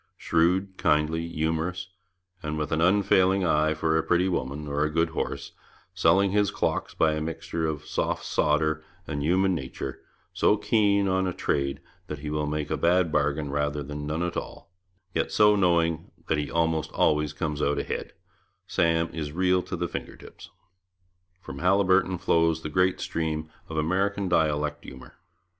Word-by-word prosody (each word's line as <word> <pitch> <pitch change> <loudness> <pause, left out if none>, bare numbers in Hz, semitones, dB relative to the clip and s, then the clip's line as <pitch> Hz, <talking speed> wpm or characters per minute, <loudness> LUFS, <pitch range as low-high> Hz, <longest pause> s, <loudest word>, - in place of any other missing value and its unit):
Shrewd, 90 +4 +1
kindly, 75 +2 +1
humorous, 80 +2 -2 0.5
with 75 -2 -3
an 80 0 +1
unfailing 95 0 +3
eye 80 -1 +2
for 80 +1 0
a 80 - +3
pretty 90 +3 +2
woman 75 -3 -3
or 70 +1 0
a 75 - +1
good 80 +1 +1
horse, 80 - -4 0.4
selling 90 +2 +3
his 105 0 +2
clocks - - -2
by 80 -1 +3
'a 75 - -2
mixture 80 0 -3
of 75 -2 -4
soft - - -2
sawder 75 +1 +1 0.2
and 70 -2 -4
human 95 +5 +2
natur',' 65 -7 -5 0.3
so 105 - +3
keen 100 -2 +2
on 95 0 +1
a 90 - -2
trade 70 -3 -1 0.3
that 75 - -5
he 75 +1 -6
will 75 0 -1
make 75 0 -3
a - - 0
bad 85 -1 +2
bargain 75 -1 0
rather 75 0 -1
than 75 +1 -6
none 80 +3 -1
at 85 -1 -3
all, - - -7 0.4
yet - - -1
so 105 -1 +5
knowing 85 -4 +1 0.2
that 80 - +1
he 75 -1 -3
almost 80 -1 0
always 75 -1 +2
comes 75 -1 -3
out 75 0 +1
ahead, - - -4 0.5
Sam 85 -3 +1
is 75 -3 -4
real 90 +1 +2
to 90 - -5
the 85 0 -2
finger - - -6
tips. - - -13 0.9
From 70 -6 -8
Haliburton 95 +1 +3
flows 80 -2 +1
the 75 - -3
great 90 +3 +2
stream 80 -1 -3 0.2
of 80 - -5
American 95 +5 0
dialect 75 -3 0
humour. 65 -1 -12
80 Hz, 165 wpm, -26 LUFS, 75-90 Hz, 0.9 s, so